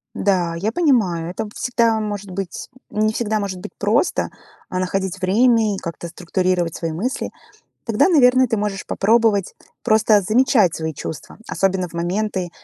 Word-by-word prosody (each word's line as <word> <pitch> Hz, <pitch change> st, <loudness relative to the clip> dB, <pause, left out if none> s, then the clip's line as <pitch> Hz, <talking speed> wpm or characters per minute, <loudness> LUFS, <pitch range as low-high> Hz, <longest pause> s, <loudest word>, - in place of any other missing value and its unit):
Да, 180 Hz, -4 st, +1 dB
я 205 Hz, +6 st, -1 dB
понимаю, 220 Hz, -, +1 dB
это 220 Hz, -, -4 dB
б 210 Hz, -, -9 dB
всегда 230 Hz, -2 st, +1 dB
может 205 Hz, -2 st, -4 dB
быть, 190 Hz, 0 st, -5 dB, 0.2 s
м, -, -, -5 dB
не -, -, +2 dB
всегда 215 Hz, -2 st, -1 dB
может 190 Hz, -2 st, -4 dB
быть -, -, -9 dB
просто, 210 Hz, -, +1 dB, 0.4 s
а, 185 Hz, -, -2 dB
находить 190 Hz, 0 st, -2 dB
время 220 Hz, +2 st, +3 dB
и -, -, -6 dB
как-то 170 Hz, -1 st, -6 dB
структурировать 180 Hz, 0 st, -1 dB
свои 165 Hz, -2 st, -4 dB
мысли. 230 Hz, +11 st, -3 dB, 0.6 s
Тогда, 225 Hz, -, +3 dB
наверное, 255 Hz, -5 st, +5 dB
ты 225 Hz, -2 st, -1 dB
можешь 205 Hz, -2 st, -3 dB
попробовать 215 Hz, -2 st, +2 dB, 0.3 s
просто 220 Hz, -2 st, +4 dB
замечать 215 Hz, -, +3 dB
свои 160 Hz, 0 st, -3 dB
чувства, 155 Hz, -, -8 dB
особенно 190 Hz, -2 st, 0 dB
в -, -, -19 dB
моменты, 185 Hz, +1 st, -2 dB
200 Hz, 160 wpm, -20 LUFS, 180-225 Hz, 0.6 s, наверное